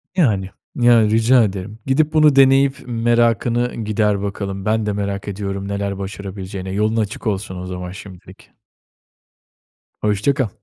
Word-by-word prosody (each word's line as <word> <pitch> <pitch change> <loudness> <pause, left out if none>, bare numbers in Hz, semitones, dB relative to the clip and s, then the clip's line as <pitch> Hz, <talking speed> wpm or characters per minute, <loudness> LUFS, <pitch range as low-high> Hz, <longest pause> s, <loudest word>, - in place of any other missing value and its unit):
Yani. 105 - +1 0.3
Ya, 120 -1 +5
rica 115 +3 +4
ederim. 100 +1 -4
Gidip 150 +4 +1
bunu 155 -3 +5
deneyip 135 0 +5
merakını 120 0 +1
gider 105 -2 0
bakalım. 100 -1 -4
Ben 110 0 +1
de 105 - -1
merak 100 -1 -3
ediyorum 100 -1 -4
neler 100 -1 -3
başarabileceğine, 95 -1 -6
yolun 110 +3 0
açık 110 +2 -2
olsun 100 -2 -2
o 90 - -6
zaman 90 -1 -6
şimdilik. 95 -1 -13 1.5
Hoşça 105 +6 +1
kal. 130 -7 -1
105 Hz, 135 wpm, -19 LUFS, 100-120 Hz, 1.5 s, Ya